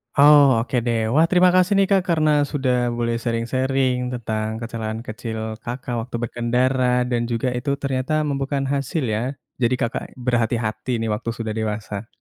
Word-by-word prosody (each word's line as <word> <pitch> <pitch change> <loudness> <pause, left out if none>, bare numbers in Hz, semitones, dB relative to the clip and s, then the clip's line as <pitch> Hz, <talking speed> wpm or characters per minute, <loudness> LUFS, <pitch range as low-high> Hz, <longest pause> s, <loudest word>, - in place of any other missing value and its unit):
Oh 145 +1 +8 0.2
oke 130 - -5
deh. 115 -1 0
Wah, 160 +4 +5
terima 180 0 +5
kasih 185 +2 +4
nih 195 -1 +4
Kak 195 -1 +5
karena 155 -2 +3 0.2
sudah 130 -3 0 0.2
boleh 115 0 0
sharing-sharing 130 +3 0 0.2
tentang 110 -2 -3
kecelakaan 115 -1 -4
kecil 110 +1 -5 0.3
Kakak 125 0 -4
waktu 125 +1 -7
berkendara 125 +2 +1
dan 120 -1 0
juga 115 +2 0
itu 135 +3 -3
ternyata 130 +1 -1
membuahkan 140 0 -1
hasil 140 +2 -1
ya? 110 - -1 0.4
Jadi 120 +2 +3
Kakak 115 0 -1
berhati-hati 120 -2 -1
nih 115 - -1
waktu 105 +2 -3
sudah 115 -2 -3
dewasa. 105 0 -4
125 Hz, 155 wpm, -22 LUFS, 115-135 Hz, 0.4 s, Oh